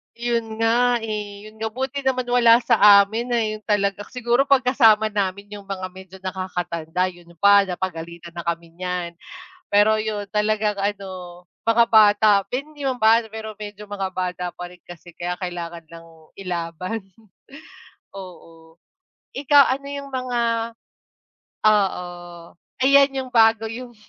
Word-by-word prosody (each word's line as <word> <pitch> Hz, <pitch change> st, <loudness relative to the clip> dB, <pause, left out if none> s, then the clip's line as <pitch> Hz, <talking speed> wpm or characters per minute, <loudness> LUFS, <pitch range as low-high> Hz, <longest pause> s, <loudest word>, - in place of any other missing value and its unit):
'Yon 235 Hz, -1 st, -2 dB
nga, 240 Hz, +2 st, +3 dB
eh, 210 Hz, -1 st, -6 dB
'yon 215 Hz, 0 st, -20 dB
nga. 220 Hz, -, -2 dB
Buti 265 Hz, +3 st, -3 dB
naman 255 Hz, -1 st, +1 dB
wala 240 Hz, -1 st, +5 dB
sa 200 Hz, -1 st, +7 dB
amin, 230 Hz, +4 st, -4 dB
ayun 215 Hz, -2 st, -1 dB
talaga, 205 Hz, -1 st, 0 dB
siguro 250 Hz, +2 st, 0 dB
pag 275 Hz, -2 st, +4 dB
kasama 220 Hz, -4 st, +4 dB
namin 200 Hz, 0 st, -3 dB
yung 200 Hz, -1 st, -14 dB
mga 190 Hz, -1 st, -4 dB
medyo 190 Hz, 0 st, -13 dB
nakaka-tanda 180 Hz, -1 st, -3 dB
'yon 175 Hz, -1 st, -18 dB
pa 200 Hz, +1 st, +5 dB
napagalitan 170 Hz, -2 st, -6 dB
na 170 Hz, 0 st, -8 dB
kami 170 Hz, 0 st, -4 dB
niyan. 180 Hz, 0 st, -4 dB, 0.6 s
Pero 205 Hz, +2 st, +4 dB
'yon 215 Hz, -2 st, -3 dB
talagang 210 Hz, 0 st, 0 dB
ano 190 Hz, -3 st, -5 dB, 0.2 s
mga 230 Hz, +1 st, +4 dB
bata 215 Hz, -1 st, +5 dB, 0.2 s
hindi 290 Hz, +3 st, -5 dB
naman 260 Hz, -2 st, -1 dB
bata, 225 Hz, +1 st, +4 dB
pero 220 Hz, 0 st, -7 dB
medyo 210 Hz, 0 st, -9 dB
mga 200 Hz, -2 st, -4 dB
bata 180 Hz, -1 st, -3 dB
pa 180 Hz, -, -8 dB
rin 180 Hz, -1 st, -17 dB
kasi 175 Hz, 0 st, -13 dB
kaya 175 Hz, +1 st, -4 dB
kailangan 170 Hz, -2 st, -6 dB
lang 165 Hz, +1 st, -12 dB, 0.3 s
ilaban, 180 Hz, +2 st, -4 dB, 1.1 s
oo. 165 Hz, -4 st, -13 dB, 0.6 s
Ikaw 285 Hz, +1 st, +5 dB, 0.2 s
ano 280 Hz, -, -12 dB
yung 280 Hz, 0 st, -6 dB
mga 255 Hz, -2 st, -2 dB, 1.3 s
oo. 200 Hz, -4 st, +2 dB, 0.8 s
Ayan 280 Hz, +1 st, +5 dB
'yong 260 Hz, -1 st, -5 dB
bago, 225 Hz, -1 st, +4 dB
'yong 245 Hz, +1 st, -8 dB
205 Hz, 140 wpm, -22 LUFS, 180-230 Hz, 1.3 s, sa